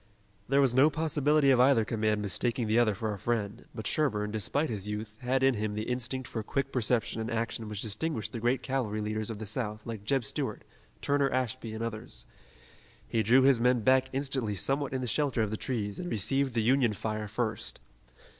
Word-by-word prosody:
There 140 +1 +4
was 130 -3 +4
no 135 +4 +6
possibility 150 -2 +2
of 130 - +4
either 125 -3 +5
command 110 -2 0
mistaking 120 +5 -1
the 110 +2 +3
other 110 -4 +3
for 110 +2 -2
a 100 - -7
friend, 110 0 -2
but 110 -3 -6
Sherburne, 105 -9 +1
despite 130 +8 -1
his 105 -2 -4
youth, 105 +1 -5
had 130 +1 +1
in 135 0 +5
him 105 -2 -2
the 105 +1 -2
instinct 125 +2 -3
for 115 - -4
quick 135 +5 -2
perception 115 -2 +1
and 110 - -3
action 115 -1 -2
which 105 -2 -3
distinguished 110 0 -2
the 115 - -5
great 120 +3 +1
cavalry 120 -6 -1
leaders 110 0 -2
of 110 - -4
the 110 - -6
South 105 -1 -3
like 110 -3 -6
Jeb 130 +2 0
Stuart, - - -3 0.4
Turner 140 -1 +2
Ashby 130 -3 -2
and 110 - -4
others. 110 - -5 0.8
He 115 - +1
drew 120 +5 +5
his 135 -3 +5
men 125 0 +3
back 130 +2 +3
instantly 130 -6 -1
somewhat 135 +7 0
in 130 -1 -2
the 125 - -2
shelter 130 -1 +1
of 105 - -2
the - - -1
trees 105 -4 -3
and 175 - -4
received 130 - 0
the 115 - +2
Union 125 -1 +3
fire 110 +1 -3
first. 110 0 -2
115 Hz, 205 wpm, -30 LUFS, 110-130 Hz, 0.8 s, no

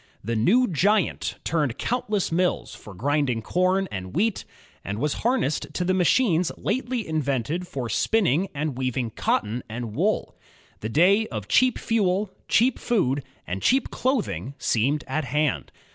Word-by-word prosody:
The 115 +3 -2
"new 205 - +4
giant" 195 +4 +1
turned 145 -7 0
countless 215 -6 -1
mills 180 +2 0
for 105 - -11
grinding 130 0 0
com 185 - +1
and 95 -1 -6
wheat, 210 +3 0 0.4
and 100 +1 -4
was 150 +5 0
harnessed 235 - 0
to 180 - 0
the 185 - +2
machines 180 -1 +3
lately 245 -1 -2
invented 155 +2 -1
for 130 -7 -4
spiiming 185 - +2
and 150 0 -1
weav 130 0 -2
ing 120 -3 -1
cotton 110 +3 -1
and 115 -1 -5
wool. - - 0 0.4
The 110 - -4
day 195 - +4
of 105 -4 -6
cheap 255 -1 +3
fuel, 200 -3 0 0.2
cheap 245 +2 +3
food, 145 - +1 0.2
and 95 +2 -4
cheap 265 +1 +2
clothing 140 - -1
seemed 135 +7 +1
at 155 -2 -1
hand. 150 0 0
155 Hz, 150 wpm, -25 LUFS, 125-205 Hz, 0.4 s, new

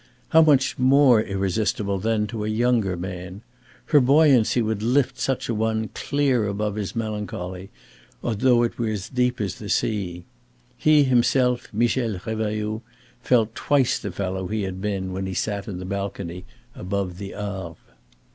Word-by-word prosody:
How 160 - +6
much 145 -6 +3
more 130 -3 +5
irresistible 100 0 -1
then 110 +1 0
to 110 -1 -5
a - - -2
younger 110 -4 +1
man. 90 +2 -7 0.4
Her 150 - +5
buoyancy 135 -3 +4
would 110 -2 -1
lift 125 +4 +1
such 135 -2 -1
an 115 - -1
one 110 0 0
clear 135 -6 0
above 105 +1 -2
his 105 0 -4
melancholy, 105 -4 -4 0.5
though 120 +2 +3
it 120 - -2
were 110 -2 -1 0.2
deep 125 0 +1
as 100 -3 -3
the 105 - -7
sea. 90 -6 -1 0.5
He 155 -1 +4
himself, 125 -1 +2
Michel 115 -1 0
Revailloud, 110 +1 -3 0.4
felt 115 -3 +2
twice 140 -1 +1
the 100 - -5
fellow 95 0 -3
he 110 +1 -2
had 95 -1 -5
been 95 -2 -2
when 95 0 -3
he 95 - -4
sat 105 0 -2
in 100 -4 -5
the 90 - -6
balcony 95 -2 -5 0.3
above 95 -1 -3
the 100 -1 -7
Arve. 95 -5 -5
110 Hz, 155 wpm, -23 LUFS, 95-120 Hz, 0.5 s, How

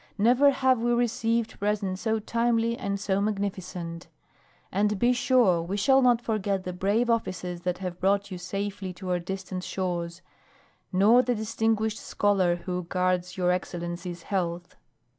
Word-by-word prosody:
Never 245 +7 +5
have 260 -2 +2
we 240 +1 +1
received 230 -1 0
presents 200 -2 -1
so 220 -1 +1
timely 230 +1 +1
and 200 -3 -3
so 195 -1 0
magnificent. 185 -5 -3 0.6
And 205 +2 +1
be 240 +5 +3
sure 245 -9 +3
we 180 +4 -3
shall 265 +6 +4
not 240 -2 +3
forget 200 -4 -1
the 180 - -4
brave 200 +6 +1
officers 185 -6 -2
that 180 0 -2
have 180 -2 -5
brought 200 +1 +1
you 180 - -5
safely 195 +1 -4
to 180 +1 -5
our 180 - +1
distant 185 +1 -5
shores, 175 -2 -3 0.7
nor 210 +6 +5
the 245 0 0
distinguished 220 0 0
scholar 195 -4 +1
who 180 0 -4
guards 180 0 -1
your 180 -1 +2
excellency's 175 -1 -4
health." 175 -3 -3
195 Hz, 150 wpm, -27 LUFS, 180-225 Hz, 0.7 s, Never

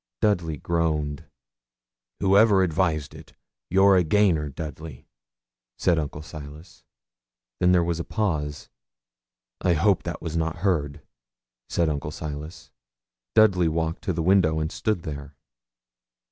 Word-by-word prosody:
Dudley 85 -7 +1
groaned. 75 -2 -1 1.0
'Whoever 100 0 +5
advised 80 -4 0
it, - - -13 0.4
you're 95 +2 +5
a 90 - +4
gainer, 80 -4 +2
Dudley,' 75 -2 -8 0.7
said 85 -2 +2
Uncle 75 0 -5
Silas. 75 +2 -11 0.8
Then 90 - +4
there 90 -1 +4
was 85 0 -2
a - - -2
pause. 80 -10 -2 0.9
'I 90 - +3
hope 95 +4 +2
that 85 - -5
was 85 -1 -5
not 80 -1 -1
heard,' 75 -7 0 0.7
said 85 - +1
Uncle 75 -1 -2
Silas. 75 +2 -7 0.6
Dudley 100 -6 +5
walked 80 0 -2
to 95 - 0
the 85 -2 -2
window 85 -4 +3
and 80 +1 -2
stood 105 -6 -2
there. 70 -2 -7
80 Hz, 125 wpm, -25 LUFS, 75-90 Hz, 1.0 s, Whoever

